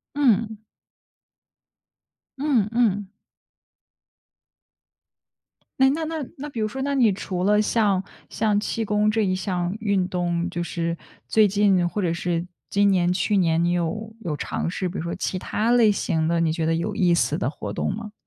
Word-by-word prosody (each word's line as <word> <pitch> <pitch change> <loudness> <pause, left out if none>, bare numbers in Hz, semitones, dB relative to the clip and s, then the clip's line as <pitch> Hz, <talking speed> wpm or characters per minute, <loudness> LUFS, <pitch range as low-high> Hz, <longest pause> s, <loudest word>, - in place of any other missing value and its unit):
嗯。 225 -6 +1 1.8
嗯 265 -8 +2
嗯。 205 -4 +1 2.7
诶， 265 0 +6
那 320 +3 -1
那 315 -1 -3
那 260 - -7
那 290 +2 -6
比 240 - -6
如 215 - +1
说， 265 +5 -5
那 280 +1 -1
你 245 -6 +4
除 185 -1 -3
了 210 +2 +4
像 205 -3 +1 0.3
像 210 -2 +1
气 225 +1 -2
功 210 +1 +2
这 215 0 +1
一 185 -1 +1
项 185 -1 -2
运 200 -4 +1
动， 175 -1 -1
就 175 - -3
是 170 -1 -2 0.3
最 215 -1 +4
近 195 -3 +3
或 210 - -4
者 170 -3 0
是 170 0 -2 0.2
今 200 0 +3
年、 180 -2 +2
去 200 +3 +1
年， 165 -2 +2
你 175 - +2
有 210 +6 -2
有 160 -8 -3
尝 - - -3
试 180 +1 -2
比 180 - -5
如 - - -3
说 170 0 -3
其 185 - -3
他 220 +5 -1
类 235 -3 +5
型 160 -5 0
的， 170 0 +1
你 165 -1 +1
觉 165 -1 -1
得 165 - +2
有 195 +5 -2
意 180 -4 +3
思 155 -2 +1
的 - - 0
活 150 - -6
动 - - -1
吗？ 215 0 -7
200 Hz, 190 characters per minute, -24 LUFS, 175-220 Hz, 2.7 s, 诶